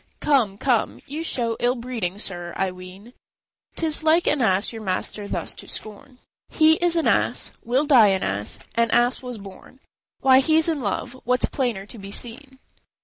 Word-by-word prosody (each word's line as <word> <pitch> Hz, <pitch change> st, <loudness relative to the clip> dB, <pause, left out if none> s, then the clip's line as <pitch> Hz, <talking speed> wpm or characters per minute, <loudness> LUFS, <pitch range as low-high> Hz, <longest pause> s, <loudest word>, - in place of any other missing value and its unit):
B. -, -, -38 dB, 0.2 s
"Come, 245 Hz, -10 st, +2 dB
come, 245 Hz, -1 st, 0 dB
you 295 Hz, +3 st, -5 dB
show 235 Hz, -8 st, -1 dB
ill 245 Hz, +1 st, +1 dB
breeding, 230 Hz, -7 st, -4 dB
sir, 175 Hz, -4 st, -3 dB
I 190 Hz, -1 st, 0 dB
ween; 185 Hz, +5 st, -12 dB, 0.6 s
'Tis 320 Hz, -2 st, 0 dB
like 320 Hz, +2 st, +3 dB
an 295 Hz, -2 st, +2 dB
ass 200 Hz, 0 st, +1 dB
your 225 Hz, -, -7 dB
master 200 Hz, +1 st, -3 dB
thus -, -, -3 dB
to -, -, -12 dB
scorn." 220 Hz, +4 st, -6 dB, 0.3 s
R. -, -, -14 dB
He 315 Hz, 0 st, +6 dB
is 345 Hz, -1 st, +2 dB
an 330 Hz, -, +1 dB
ass, -, -, +1 dB
will 255 Hz, +5 st, +1 dB
die 255 Hz, -8 st, +6 dB
an 190 Hz, -1 st, +1 dB
ass, 100 Hz, +2 st, -2 dB, 0.2 s
an 230 Hz, 0 st, +1 dB
ass 240 Hz, +2 st, +2 dB
was 250 Hz, -2 st, -7 dB
born; 200 Hz, +5 st, -13 dB, 0.4 s
Why, 260 Hz, -1 st, +6 dB
he's 315 Hz, +4 st, +4 dB
in 315 Hz, -4 st, 0 dB
love; 230 Hz, +4 st, -3 dB
what's 250 Hz, +1 st, +2 dB
plainer 240 Hz, -8 st, -2 dB
to 220 Hz, +2 st, -12 dB
be 195 Hz, 0 st, -9 dB
seen?" 255 Hz, +6 st, -6 dB
240 Hz, 190 wpm, -23 LUFS, 200-270 Hz, 0.6 s, He